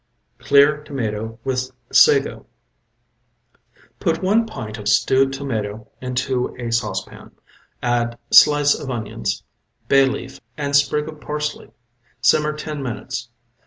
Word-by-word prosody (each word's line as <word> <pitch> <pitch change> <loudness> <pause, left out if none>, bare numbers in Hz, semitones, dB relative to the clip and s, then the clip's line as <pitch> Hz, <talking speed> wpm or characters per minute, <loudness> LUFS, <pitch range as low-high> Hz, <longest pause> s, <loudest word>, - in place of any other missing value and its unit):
CLEAR 145 +1 +4
TOMATO 115 -5 -4
WITH 130 -1 -2 0.2
SAGO 435 -2 +4 1.5
Put 165 -1 -1
one 220 +4 +3
pint 110 - -7
of 105 - -6
stewed 135 0 +3
tomatoe 110 -6 -4
into 125 0 -2
a 120 -1 -4
saucepan, 105 -5 -3 0.5
add 120 -1 0
slice 145 -1 +7
of 140 - -6
onions, 110 -4 -3 0.5
bay 135 -1 +5
leaf 135 0 -5 0.2
and 140 -1 -1
sprig 150 +1 +2
of 155 -1 -9
parsley. 150 0 -4 0.5
Simmer 150 +4 +3
ten 150 -1 -6
minutes. 120 -1 -5
135 Hz, 115 wpm, -21 LUFS, 115-150 Hz, 1.5 s, slice